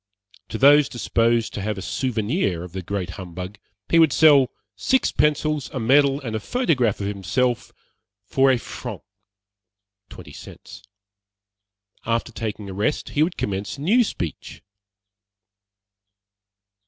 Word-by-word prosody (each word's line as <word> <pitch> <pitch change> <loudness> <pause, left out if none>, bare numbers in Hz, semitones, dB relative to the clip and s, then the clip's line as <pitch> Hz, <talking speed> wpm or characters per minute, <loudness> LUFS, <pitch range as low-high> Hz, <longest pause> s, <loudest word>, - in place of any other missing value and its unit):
To 110 - -4
those 145 +3 +6
disposed 115 -1 0
to 100 - -4
have 105 0 -3
a - - -5
souvenir 110 - -1
of 90 - -9
the 95 +1 -5
great 90 -1 -4
humbug 90 +3 -8 0.3
he 165 - +4
would 160 -3 +5
sell 140 -4 +6 0.3
six 255 - +1
pencils, 150 -1 0
a 130 - -3
medal 135 +4 +3
and 115 -5 -4
a - - -1
photograph 130 - 0
of - - -2
himself 105 +5 -1 0.5
for 135 0 +3
a 130 - +4
franc - - -8 1.1
(twenty - - -12
cents.) - - -12 1.2
After 115 +1 -1
taking 110 -3 -5
a 95 - -7
rest 105 +10 -1
he 145 - -1
would 170 +3 +1
commence 100 +4 -3
a - - -9
new 220 +11 +4
speech. 85 - -6
115 Hz, 135 wpm, -23 LUFS, 100-145 Hz, 1.2 s, those